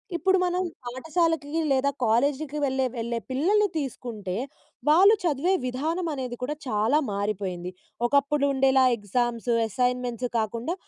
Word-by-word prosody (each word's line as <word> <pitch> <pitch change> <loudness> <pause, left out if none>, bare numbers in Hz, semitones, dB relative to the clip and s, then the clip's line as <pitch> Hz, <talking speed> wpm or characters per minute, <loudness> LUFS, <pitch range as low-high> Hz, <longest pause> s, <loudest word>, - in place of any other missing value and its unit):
ఇప్పుడు 380 +3 +3
మనం 360 0 0 0.2
పాఠశాలకి 320 +4 -1
లేదా 270 +1 +3
కాలేజీకి 280 +6 +1
వెళ్ళే, 265 -1 +1
వెళ్ళే 235 0 -2
పిల్లల్ని 400 +11 +3
తీసుకుంటే 240 - -4 0.6
వాళ్ళు 375 +7 +7
చదివే 335 +2 +1
విధానం 315 +8 -2
అనేది 255 -3 -4
కూడా 280 +4 -2
చాలా 220 +3 +2
మారిపోయింది. 195 -3 -3 0.3
ఒకప్పుడు 280 +2 +2
ఉండేలా 265 0 +4
ఎగ్జామ్స్, 235 +3 -2 0.2
అసైన్‌మెంట్స్, 250 +2 -1
కాకుండా, 230 +7 -2
260 Hz, 115 wpm, -26 LUFS, 235-305 Hz, 0.6 s, వాళ్ళు